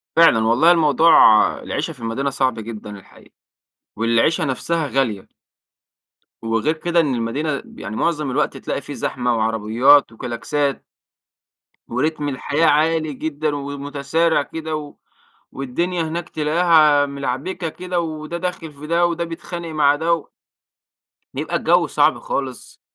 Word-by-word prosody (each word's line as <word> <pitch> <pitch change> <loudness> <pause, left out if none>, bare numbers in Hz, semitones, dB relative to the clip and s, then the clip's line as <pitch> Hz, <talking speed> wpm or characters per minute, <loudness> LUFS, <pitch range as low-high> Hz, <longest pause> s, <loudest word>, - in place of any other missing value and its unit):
فعلًا، 165 -9 +6
والله 130 +10 +5
الموضوع 165 0 +4 0.5
العيشة - - -3
في 130 - -20
المدينة 115 +5 -2
صعب 130 -4 -1
جدًا 110 -1 -8
الحقيقة، - - -20 0.6
والعيشة 115 - +2
نفسها 155 +4 -1
غالية. 130 -8 -1 1.1
وغير 115 +7 0
كده، 170 +1 0
إن 145 -6 +1
المدينة 140 +6 -2
بِ - - -13
معظم 145 +7 -2
الوقت - - -1
تلاقي - - -4
في - - -8
زحمة 125 -1 -1
وعربيات 115 +5 +3
وكلاكسات. 125 +5 -3 1.0
ورتم 145 +4 -1
الحياة 145 +4 0
عالي 155 0 +2
جدًا 150 +1 -3
ومتسارع 145 +3 -1
كده، 160 +2 -5
و 150 -1 -7 0.6
والدنيا 170 +7 -2
هناك 165 +2 -4
تلاقيها 155 -2 +3
ملعبكة 140 +6 -4
كده، 180 +2 -4
وده 155 +1 -5
داخل 175 -3 -5
في 150 +2 -10
ده، 170 +1 +2
وده 170 0 -2
بيتخانق 170 +1 -7
مع 145 -2 +3
ده 165 0 -1 1.0
بيبقى - - -3
الجو - - +2
صعب - - +2
خالص. 130 -3 -5
145 Hz, 125 wpm, -20 LUFS, 130-165 Hz, 1.1 s, فعلًا